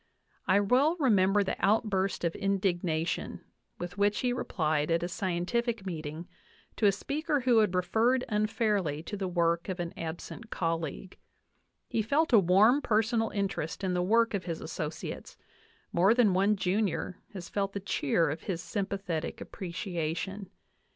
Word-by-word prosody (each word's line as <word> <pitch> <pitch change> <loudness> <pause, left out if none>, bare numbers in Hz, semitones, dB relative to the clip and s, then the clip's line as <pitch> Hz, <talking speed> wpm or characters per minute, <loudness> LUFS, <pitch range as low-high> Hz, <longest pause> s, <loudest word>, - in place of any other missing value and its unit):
I 200 - +5
well 255 - +3
remember 205 -6 +4
the 190 - -4
outburst 200 -3 +1
of 170 -1 0
indignation 180 -4 -1 0.4
with 180 +2 -6
which 205 +1 +2
he 250 -1 +1
replied 155 -9 -1
at 165 +1 +1
a - - 0
scientific 195 +5 -2
meeting 160 -2 -5 0.5
to 210 - +4
a - - +6
speaker 290 - -1
who 245 -2 +4
had 205 -4 +2
referred 225 +8 +2
unfairly 210 -7 0
to 205 - -5
the 195 -2 -3
work 170 0 0
of 185 -1 -3
an 170 -1 -3
absent 170 +7 -7
colleague. 165 +1 -3 0.7
He 225 - 0
felt 280 +6 +1
a 225 - +9
warm 200 +9 +5
personal 225 0 +1
interest 195 -3 -3
in 185 -1 0
the 180 - +1
work 230 +5 +3
of 195 -3 -2
his 165 -3 -3
associates; 155 0 -6 0.6
more 190 +6 +4
than 230 -6 +4
one 200 +3 +3
junior 190 -1 -1
has 185 -3 -7
felt 195 -1 -2
the 200 - -3
cheer 165 -4 +1
of 155 +2 -5
his 180 -4 -3
sympathetic 195 -5 -3
appreciation. 180 +2 -4
195 Hz, 150 wpm, -30 LUFS, 170-215 Hz, 0.7 s, a